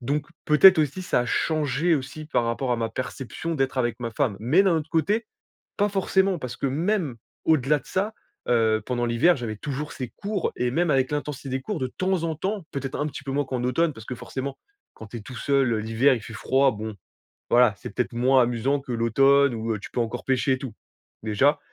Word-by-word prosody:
Donc, 145 +4 -1 0.2
peut-être 160 +4 +8
aussi, 155 +4 0
ça 180 - +1
a 120 - -2
changé 155 +4 +1
aussi 140 +2 -5
par 135 -5 0
rapport 120 +2 -1
à - - +1
ma 115 -1 -1
perception 130 +7 -5
d'être 135 0 0
avec 120 -1 0
ma 115 -1 -3
femme. 110 -4 0
Mais, 150 - +4
d'un 185 -4 +3
autre 155 0 -3
côté, 205 +8 +1 0.5
pas 205 - +3
forcément, 190 -2 +1
parce 125 -2 -6
que - - -2
même 160 - 0 0.3
au-delà 150 -1 +3
de - - -22
ça, 200 +4 -1 0.4
heu, 110 -2 +3
pendant 120 -1 -1
l'hiver, 135 +10 +4
j'avais 115 -3 -4
toujours 145 +5 -5
ces 125 -3 -5
cours. 200 -2 -3
Et 125 0 0
même 170 +3 +1
avec 135 -1 +2
l'intensité 145 -2 -4
des 130 +1 -2
cours, 205 +4 -4
de 130 - -1
temps 185 -2 0
en 160 -2 -1
temps, 195 +4 -3
peut-être 135 -1 -4
un 145 - 0
petit 145 -1 -7
peu 135 - -4
moins 145 +1 0
qu'en 130 -2 -3
automne, 150 +5 +1
parce 110 0 -12
que, 125 - -4
forcément, 135 +3 -5 0.4
quand 110 - -10
tu 115 - -7
es - - -8
tout 125 +4 -10
seul, 135 -1 +2
heu, - - 0
l'hiver, 115 +5 +3
il 115 - -6
fait 110 - -9
froid. 135 +4 +2
Bon, 110 0 -6 0.5
voilà. 120 -3 +5
C'est 100 - -9
peut-être 125 - -2
moins 130 +2 +4
amusant 120 +4 +1
que 130 -3 -6
l'automne, 135 +4 +4
où, 110 0 -2
heu, 105 - -4
tu - - -10
peux - - -2
encore 115 -1 -2
pêcher 130 0 +1
et - - 0
tout, 130 -5 -7 0.5
déjà. 135 +8 +2
135 Hz, 225 wpm, -25 LUFS, 120-155 Hz, 0.5 s, peut-être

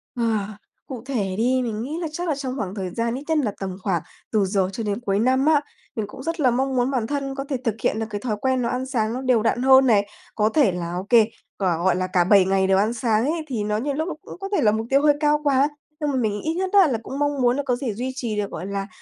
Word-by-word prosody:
Ờ, 235 - -1 0.6
cụ 250 -4 -7
thể 205 -9 -2
đi, 255 +3 +2
mình 220 -2 -3
nghĩ 300 +5 -4
là 330 - -2
chắc 345 +3 -4
là 305 - +1
trong 265 -2 -4
khoảng 200 -5 -4
thời 190 -3 -3
gian 230 +5 -2
ít 275 - -6
nhất 320 -1 +2
nà 235 -8 +1
tầm 190 -1 -4
khoảng 180 -5 0 0.3
từ 210 -3 +2
giờ 190 -1 +1
cho 225 - -4
đến 205 +1 -2
cuối 200 -4 0
năm 260 +4 +2
á, 310 -2 +4 0.3
mình 215 -2 -2
cũng 260 - -10
rất 330 +2 -3
là 255 -4 +4
mong 265 +2 0
muốn 245 +2 +1
bản 240 -5 -1
thân 275 -2 -3
có 275 - -3
thể 270 - 0
thực 225 -4 0
hiện - - +1
được 225 - -1
cái 205 -1 -4
thói 230 -4 -1
quen 260 -1 +1
nó 235 - 0
ăn 255 +1 -2
sáng 230 -4 -1
nó 255 - -3
đều 250 -4 +2
đặn 230 +2 +1
hơn 265 0 +7
này. 205 -5 +3 0.3
Có 215 0 +2
thể 270 -7 +3
là 170 -1 -4
OK, 190 +6 -5 0.5
là, 180 -4 +1
gọi 175 +1 +2
là, 185 0 -1
cả 180 -1 +2
7 195 +1 +5
ngày 190 0 +2
đều 190 0 +4
ăn 215 +4 +2
sáng 230 -1 +1
ấy 320 +2 -1
thì 235 -7 -2
nó 210 0 -1
nhiều 280 +5 -2
lúc 315 +5 -2
nó 340 - -3
cũng - - -11
có 390 - -5
thể 320 - +2
là 210 -4 +4
mục 220 +1 -2
tiêu 275 +1 +4
hơi 295 -1 +5
cao 300 -1 +3
quá, 280 -1 +3 0.3
nhưng 295 -2 -1
mà 270 - -2
mình 215 -4 0
ít 320 - -1
nhất 370 +2 -1
á 390 -5 +7
là 250 - 0
cũng 275 +4 -6
mong 290 -1 0
muốn 245 +2 +3
là 285 - -1
có 250 -2 +1
dễ 245 -4 -3
duy 250 +5 -3
trì 235 -5 -3
được, 205 -1 -2
gọi 175 - -5
là, 200 0 -3
240 Hz, 300 wpm, -23 LUFS, 205-275 Hz, 0.6 s, hơn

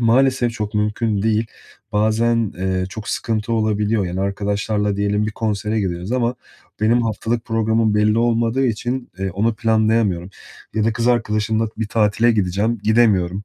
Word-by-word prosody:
maalesef 125 +1 +3
çok 105 -2 -5
mümkün 105 0 0
değil. 110 +1 +1 0.5
Bazen, 110 +1 +1
eee, 95 0 -1
çok 105 +3 -8
sıkıntı 115 0 -2
olabiliyor. 105 -2 +1
Yani, 90 +2 -3
arkadaşlarla 100 +1 -1
diyelim 105 +1 0
bir 105 - -4
konsere 105 0 -1
gidiyoruz 90 +3 -3
ama 125 -1 +1 0.5
benim 115 +3 +3
haftalık 115 +1 -2
programım 110 -1 +1
belli 105 +1 +3
olmadığı 120 +2 +1
için, 120 +2 -3
eee, 95 -1 -2
onu 110 +5 0
planlayamıyorum 110 -5 +1 0.4
ya 110 - +1
da 115 - +2
kız 115 +2 0
arkadaşımla 110 -2 +1
bir 110 -1 -3
tatile 110 +2 +2
gideceğim, 105 +3 0
gidemiyorum. 105 -4 +2
110 Hz, 145 wpm, -20 LUFS, 105-115 Hz, 0.5 s, maalesef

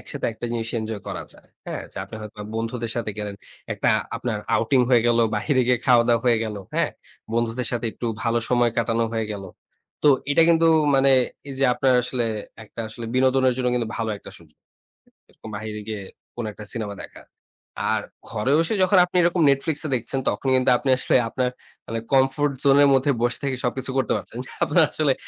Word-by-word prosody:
একসাথে - - -4
একটা 110 - -9
জিনিস 115 -1 -2
এনজয় 110 -1 -5
করা - - -4
যায়। - - -20 0.2
হ্যাঁ? - - -4
যে - - -19
আপনি 100 - -11
হয়তো 105 -1 -10 0.2
বন্ধুদের 115 0 -3
সাথে 115 -2 -2
গেলেন, 105 -1 -4 0.4
একটা - - 0 0.3
আপনার - - -3 0.2
outing 130 -2 +3
হয়ে 120 -3 +5
গেল, 120 0 +3 0.2
বাইরে 130 +6 +1
গিয়ে 125 -1 +3
খাওয়া-দাওয়া 120 -2 +4
হয়ে 120 -2 +4
গেল। 110 -1 -5 0.2
হ্যাঁ, - - +1 0.4
বন্ধুদের 120 +1 -1
সাথে 120 -1 -1
একটু 120 - -5 0.2
ভালো 115 -1 +1
সময় 120 -1 +3
কাটানো 115 0 +1
হয়ে 110 -1 -1
গেল। 100 -1 -6 0.6
তো 150 - +5 0.2
এটা 155 +3 +5
কিন্তু 165 0 +4 0.3
মানে 135 0 +4 0.4
এই 135 - -6
যে 135 - +2
আপনার 130 0 +2
আসলে 125 -1 -1 0.4
একটা 110 - -9
আসলে 115 +2 -8
বিনোদনের 130 0 +3
জন্য 125 -1 0
কিন্তু 120 -2 -1
ভালো 115 -1 -2
একটা - - -12
সুযোগ, - - -21 0.7
এরকম 110 - -12
বাইরে 105 +1 -5
গিয়ে 110 -2 -4 0.3
কোনো 120 -2 -4
একটা 105 +1 -11
সিনেমা 105 -3 -4
দেখা। - - -12 0.7
আর - - +1 0.3
ঘরে 105 +6 -1
বসে 165 +5 +1
যখন 185 +1 +4
আপনি 180 - -3
এরকম 175 0 +2
Netflix 140 +2 +1
এ - - -5
দেখছেন, 125 +3 -2
তখন 105 +6 -3
কিন্তু 130 0 +3
আপনি 135 - -3
আসলে - - +1
আপনার 125 +1 0 0.4
মানে 115 0 -3
comfort 135 +2 +3
zone 140 0 +5
এর 140 - +6
মধ্যে 135 +2 +2
বসে 120 0 +1
থেকে 135 -2 0
সবকিছু 130 +2 -2
করতে 130 - +1
পারছেন। 115 - -8
যে - - -11
আপনার 175 - +4
আসলে 145 -4 +2
120 Hz, 195 wpm, -23 LUFS, 115-135 Hz, 0.7 s, এর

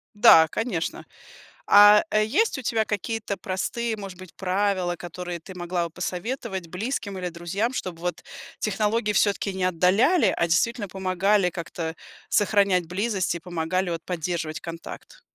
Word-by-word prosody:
Да, 160 -5 +8
конечно. 215 -8 -3 0.6
А, 205 - +8
э, 215 0 +3
есть 300 - +1
у - - -5
тебя 220 -2 0
какие-то 210 0 -3
простые, 220 +5 -3
может 195 -3 -8
быть, 185 -2 -12
правила, 185 -2 0
которые 175 0 -6
ты 190 +4 -11
могла 175 -1 -2
бы - - -6
посоветовать 185 - -4
близким 200 +1 -4
или 180 -1 -3
друзьям, 175 +8 -2
чтобы, 180 -9 -5
вот, 175 0 -3 0.4
технологии 210 +1 0
всё-таки 200 -1 +1
не 190 -1 -1
отдаляли, 190 - +3
а - - +1
действительно 205 +6 +1
помогали 190 +1 +1
как-то 165 -1 -5 0.3
сохранять 200 -4 +2
близость 190 -1 -1
и - - -4
помогали, 175 +2 -2
вот, 165 -1 -3
поддерживать 170 -2 -3
контакт. 170 - -9
185 Hz, 145 wpm, -25 LUFS, 175-210 Hz, 0.6 s, Да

